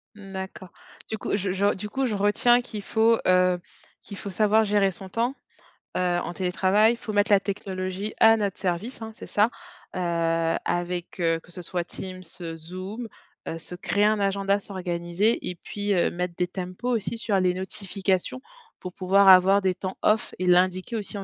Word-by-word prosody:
Mmh 195 -2 -12
d'accord. 190 -1 -7 0.4
Du 220 - -2
coup, - - -2
je 195 -2 -1
je 195 +2 0
r 205 - +3
du 210 +2 -6
coup, 270 +3 -1
je 220 -5 -1
retiens 210 +5 +4
qu'il 220 -4 -7
faut, 225 +2 +3
heu, 180 -1 +4 0.4
qu'il 200 - -10
faut 200 - -6
savoir 215 +3 +3
gérer 205 -2 +2
son 190 +1 -9
temps, 235 +6 -1 0.6
heu, - - 0 0.2
en 170 - -5
télétravail. 190 +5 +3
Il - - -7
faut 215 - -6
mettre 205 +1 +2
la 200 - +7
technologie 195 0 -4
à 225 0 +7
notre 205 -3 -2
service, 195 +7 -3
hein, 220 - -6
c'est - - -10
ça? 210 +2 +3 0.5
Heu, 165 -2 +1
avec, 175 0 -3
heu, 165 -1 +2
que 175 - -17
ce 180 - -7
soit 175 0 -3
Teams, 185 +1 -8 0.2
heu, 165 -1 -5
Zoom, 185 +8 -7 0.4
heu, 165 - -3
se 170 +2 -7
créer 205 +3 0
un 215 0 +3
agenda, 200 0 +1
s'organiser 185 +2 -1
et 180 - -4
puis, 205 +4 -3
heu, 175 - +2
mettre 175 0 -3
des 180 0 0
tempos 185 +6 -4
aussi 225 +2 -3
sur 210 -3 0
les 180 -1 +2
notifications 190 +3 -2 0.4
pour 180 - -7
pouvoir 195 +1 +4
avoir 190 +2 +7
des 190 -1 +1
temps 185 +1 -6
off 215 +1 +1
et 185 - -2
l'indiquer 185 +5 +3
aussi 205 0 -5
en 195 - -5
195 Hz, 195 wpm, -25 LUFS, 180-210 Hz, 0.6 s, la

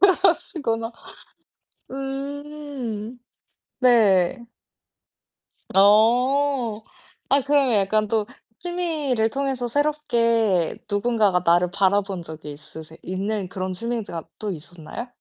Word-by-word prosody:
그러시구나. 290 -11 +2 1.0
음. 270 -4 -5 0.6
네. 230 -2 +4 1.3
어. 235 +4 +4 0.5
아 275 +1 +4
그러면 280 -3 +3
약간 210 +2 +2
또 215 -1 0 0.3
취미를 310 -10 -1
통해서 270 -1 -2
새롭게 230 - +1
누군가가 205 -4 +2
나를 175 +1 +4
바라본 195 -1 +1
적이 155 -2 -8
있으세 155 +2 -12
있는 195 +1 -3
그런 185 0 -4
취미가 220 -5 -4 0.2
또 215 - -3
있었나요? 170 - -8
225 Hz, 195 characters per minute, -23 LUFS, 195-270 Hz, 1.3 s, 네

